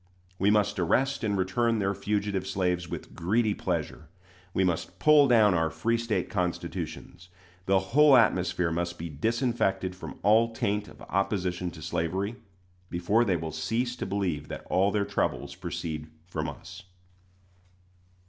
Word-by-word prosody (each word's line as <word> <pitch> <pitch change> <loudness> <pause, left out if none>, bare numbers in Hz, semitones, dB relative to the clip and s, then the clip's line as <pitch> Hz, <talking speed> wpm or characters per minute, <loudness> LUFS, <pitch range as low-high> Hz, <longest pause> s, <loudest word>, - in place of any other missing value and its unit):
We 100 - +3
must 105 -1 +2
arrest 130 +11 +1
and 105 -2 0
return 115 +5 +1
their 100 -1 0
fugitive 100 -1 -2
slaves 90 -2 -1
with - - -7
greedy 105 +5 +1
pleasure. 80 -5 -3 0.4
We 95 - +1
must 90 -3 -1
pull 150 -2 +6
down 110 -5 +5
our 80 -1 +1
free 115 +9 0
State 110 -5 -1
constitutions. 90 -1 -4 0.4
The 95 0 +4 0.2
whole 150 -1 +7
atmosphere 90 -6 +2
must 85 +1 -2
be 85 +1 -5
disinfected 95 - 0
from 95 - -9
all 115 +2 +4
taint 105 0 -1
of - - -14
opposition 90 -2 -1
to 80 -2 -11
slavery, 95 +10 -2 0.5
before 95 +7 +2
they 95 -6 +1
will 80 0 -5
cease 115 +11 -1
to - - -4
believe 90 -7 -2
that - - -7
all 95 +2 +3
their 100 0 0
troubles 100 0 -2
proceed 75 -2 -5 0.2
from 90 - -3
us. 95 +1 -10
95 Hz, 150 wpm, -28 LUFS, 90-110 Hz, 0.5 s, whole